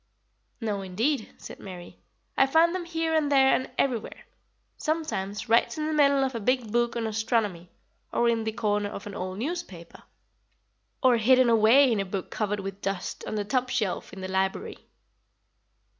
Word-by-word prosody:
"No, 210 -4 -2
indeed," 220 +7 -1
said - - -10
Mary. 180 -3 -10 0.4
"I 270 - +4
find 325 +4 +4
them 365 -2 -3
here 325 -1 -2
and 305 -2 +1
there 270 -1 +5
and 260 - 0
everywhere; 240 -5 -2 0.5
sometimes 225 -10 -3
right 230 +7 +3
in 305 - -2
the 310 - -1
middle 280 -2 +4
of 265 0 -1
a 230 - -3
big 245 0 0
book 240 +1 +1
on 230 -1 -2
astronomy, 215 -5 -1 0.4
or 235 - +2
in 230 -1 +1
the 220 - -2
corner 210 -2 -1
of 200 - -8
an 205 - -7
old 185 -1 -5
newspaper, 230 - -6 1.0
or 250 -2 +5
hidden 250 +2 +4
away 230 +5 +6
in 220 - +1
a - - +1
book 190 -1 -5
covered 210 -1 -2
with 195 +1 -7
dust 195 -2 -4
on - - -3
the 205 -1 -2
top 255 +3 0
shelf 220 -8 -2
in 190 - -9
the 185 - -4
library." 190 0 -2
225 Hz, 175 wpm, -27 LUFS, 200-270 Hz, 1.0 s, away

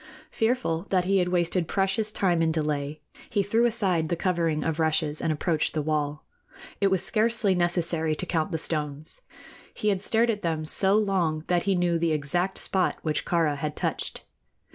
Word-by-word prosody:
Fearful 220 -7 0
that 185 -2 +2
he 195 +1 +3
had 180 - +1
wasted 175 -1 +1
precious 195 +3 0
time 180 -5 +1
in 165 -1 +2
delay, 150 -1 -2 0.3
he 205 -4 +1
threw 225 +4 +2
aside 185 -8 0
the 170 - +1
covering 165 -3 0
of 160 0 -2
rushes 155 -1 +1
and 160 - 0
approached 155 +1 -1
the 155 - +1
wall. 150 -1 -2 0.5
It 200 - +3
was 190 -2 +1
scarcely 220 -2 +2
necessary 170 -3 0
to - - -2
count 165 +1 -1
the 165 - 0
stones. 150 - -2 0.5
He 210 - 0
had 195 -2 0
stared 230 +3 +2
at 210 -2 -4
them 160 -2 -1
so 195 +5 +3
long 180 -7 0
that 175 -1 +1
he 195 -1 +2
knew 175 -1 +1
the 165 -1 +1
exact 175 +6 0
spot 185 -2 0
which 155 -2 -1
Kāra 160 -4 +1
had 150 +1 -3
touched. - - -3
170 Hz, 185 wpm, -26 LUFS, 155-195 Hz, 0.5 s, he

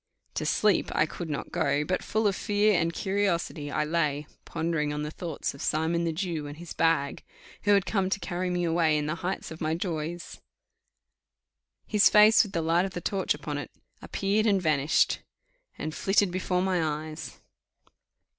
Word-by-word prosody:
To - - -2
sleep 210 -4 +2
I 155 - +4
could 165 +1 -7
not 145 - -4
go, 140 +1 +1
but 185 +4 -1
full 220 +1 0
of 200 -2 +3
fear 205 +2 +2
and 170 -2 +2
curiosity 175 -6 -1
I 145 - 0
lay, 150 -2 0 0.2
pondering 160 -2 -1
on 150 0 -3
the 150 - -4
thoughts 165 -2 -4
of 140 - -11
Simon 165 +2 0
the 165 - 0
Jew 165 -3 -3
and 145 +1 -8
his 170 0 -8
bag, 165 -4 +1 0.4
who 205 - +5
had 195 -1 +2
come 195 -3 0
to 195 - -1
carry 180 0 -3
me 180 0 0
away 165 -2 +2
in 150 - -1
the 155 - -1
height 185 -1 -3
of 160 - -9
my 160 0 0
joys. 170 -1 -4 1.4
His 210 -2 +5
face 215 +1 +7
with 210 - -3
the 165 - 0
light 170 +3 +2
of 190 - -6
the - - -2
torch 190 -3 0
upon 145 0 -4
it 145 - -6 0.3
appeared 205 +3 0
and 200 -2 +3
vanished, 155 -4 +2 0.6
and 155 - -4
flitted 195 +1 +2
before 180 0 0
my 185 -2 +1
eyes. 155 -3 -4
170 Hz, 185 wpm, -28 LUFS, 155-190 Hz, 1.4 s, face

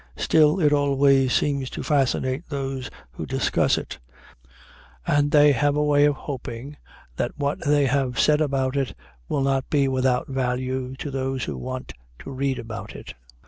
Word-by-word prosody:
Still, 155 +2 +3
it 150 -3 +3
always 140 -2 +3
seems 140 -2 0
to - - -6
fascinate 135 +1 0
those 135 -3 -4 0.2
who - - -7
discuss - - +1
it, - - -6 1.1
and 145 - +2
they 145 0 +6
have 145 +2 +1
a 150 - +1
way 145 -1 +4
of 145 -1 +2
hoping 135 0 -7 0.4
that - - -2
what 145 +5 -2
they 145 -1 +3
have 130 -3 0
said 150 0 +4
about 135 -2 0
it 135 -2 -1 0.3
will 140 - 0
not 135 -1 0
be 140 -2 +2
without 130 0 +1
value 130 0 -2
to 140 +2 -6
those 135 -1 -2
who - - -4
want 130 0 -6 0.2
to - - -9
read 135 0 -1
about 115 -1 -7
it. - - -9
135 Hz, 165 wpm, -24 LUFS, 130-145 Hz, 1.1 s, they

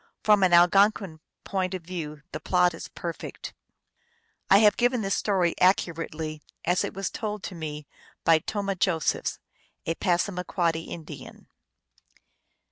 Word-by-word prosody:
From 210 -2 +5
an 185 -2 +4
Algonquin 180 0 +4 0.2
point 190 -1 -2
of 180 - -7
view 155 -4 -6
the 155 - -5
plot 180 0 +2
is 165 - -8
perfect. 170 -1 -7 1.0
I 195 - +8
have 210 -1 +5
given 245 0 +2
this 195 -1 -1
story 185 -5 +1
accurately 165 -4 0 0.2
as 180 +2 +2
it - - -4
was 195 0 -3
told 210 -2 -4
to - - -5
me 150 -3 -6 0.4
by 165 -1 +5
Tomah 200 +3 -2
Josephs, 170 -3 0 0.5
a 165 - 0
Passamaquoddy 175 -2 0
Indian. 165 -3 -9
180 Hz, 130 wpm, -26 LUFS, 165-195 Hz, 1.0 s, I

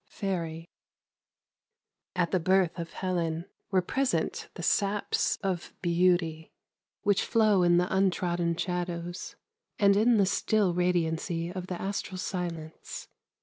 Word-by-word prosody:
— - - -48 0.2
FAIRY. 165 -4 -2 1.5
AT 175 -2 +1
the 185 - +2
birth 185 0 +2
of 170 0 -5
Helen 170 -3 -2 0.2
were 185 -3 +2
present 265 +7 -1
the - - -6
saps 205 0 +1
of 185 -3 -3
beauty 170 -2 +2 0.5
which 205 -1 +3
flow 215 -4 +3
in 175 -1 +5
the 180 +2 +1
untrodden 175 -3 +1
shadows 175 -1 -3 0.4
and 200 -1 +5
in 225 +3 +4
the 200 - +5
still 200 -1 +2
radiancy 170 -1 0
of 185 -1 -6
the 180 -2 -4
astral 195 -1 -3
silence. 170 -4 -5
180 Hz, 125 wpm, -29 LUFS, 170-195 Hz, 1.5 s, in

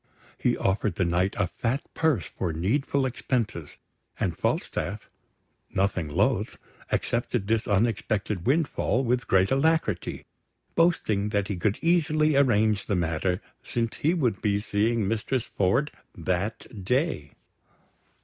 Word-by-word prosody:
He - - +1
offered 100 +2 0
the 95 - +1
Knight 90 +3 +1
a 100 - +2
fat 120 - -2
purse 160 -6 +1
for 90 - -3
needful 130 - 0
expenses; 115 - -2 0.4
and - - 0
Falstaff, - - -2 0.7
nothing 95 -5 0
loath, 75 - +1 0.3
accepted 120 -2 0
this 110 +1 0
unexpected 105 -2 0
windfall 140 -3 +1
with 125 +1 0
great 95 0 +3
alacrity, 135 - +1 0.5
boasting 110 - +2
that 100 -1 0
he 100 - -1
could 100 +3 0
easily 155 -3 +3
arrange 110 -7 +3
the 100 - +1
matter, 90 +3 0 0.2
since 115 -1 -2
he 160 +4 +2
would 120 - 0
be 100 -1 +1
seeing 105 +1 0
Mistress 115 +3 -1
Ford 100 +11 +1 0.3
that 95 +4 -3
day. 125 - 0
110 Hz, 125 wpm, -26 LUFS, 95-130 Hz, 0.7 s, great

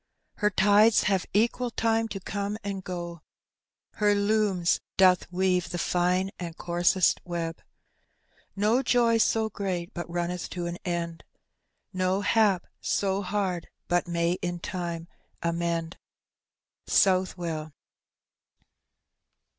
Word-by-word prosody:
Her 210 - +2
tides 210 +3 +5
hare 195 -2 +2
equal 235 +4 +1
time 225 0 +1
to 200 -3 -5
Dome 200 +2 -3
and 195 -1 -4
go, 175 -2 -6 0.8
Her 205 -1 +3
looms 200 -4 +2 0.2
doth 185 -1 +4
weave 180 -1 +1
the 175 - -4
fine 180 +2 +1
and 170 -2 -6
ooaraest 175 +1 +2
wi 170 -2 -3 1.0
No 215 +6 +2
jof 235 -3 +3
so 220 0 +2
great, 185 -4 -3
bnc 175 -2 -5
nmneth 175 0 -3
to 175 -1 -4
an 175 +1 -4
end, 170 -2 -3 0.7
Vo 185 +2 0
hBfi 200 -1 +1
in - - -4
hard 185 -3 -2 0.2
bat 175 -1 +1
may 170 +1 0
in 175 0 -2
tnu« 170 -2 -4 0.4
nmend. 170 0 -1 0.9
Southwell. 175 -5 +1
185 Hz, 115 wpm, -27 LUFS, 175-205 Hz, 1.0 s, tides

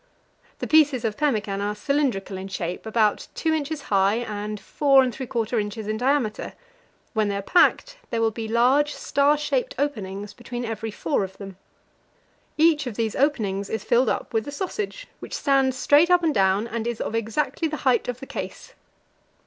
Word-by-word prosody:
The - - -4
pieces 295 -6 +4
of 215 -2 -1
pemmican 215 -9 0
are 205 +1 -2
cylindrical 245 -5 -1
in 190 +1 -6
shape, 180 +1 -4
about 220 -2 +1
2 320 - 0
inches 305 -1 -2
high 195 +1 +4
and 210 -2 -4
4 275 +2 +4
and 250 -2 -1
3/4 235 -3 -1
inches 210 +1 -5
in 215 0 -1
diameter; 250 -3 0 0.6
when 215 -2 +1
they 200 - -1
are 200 - -4
packed, - - +3
there 230 - -1
will 225 -1 +2
be 220 0 -5
large 255 +6 +3
star 285 +1 +2
shaped - - -1
openings 205 -7 -3
between 240 0 -6
every 225 0 -4
four 215 +3 -1
of 190 0 -7
them. 195 -2 -9 1.0
Each 305 -3 +4
of 235 - -5
these 225 -1 -1
openings 205 -9 0
is 220 - -3
filled 240 0 +3
up - - -3
with 225 +2 0
a - - -4
sausage, 405 +9 -4
which - - -7
stands 270 -2 +2
straight 295 +6 +5
up 355 -1 +4
and 320 -2 +2
down, 195 +2 +2
and 230 0 -3
is 235 -2 -3
of - - -3
exactly 230 +9 -1
the 310 0 -4
height 255 -2 +3
of 245 0 -4
the - - -6
case. - - -7
235 Hz, 185 wpm, -24 LUFS, 210-285 Hz, 1.0 s, straight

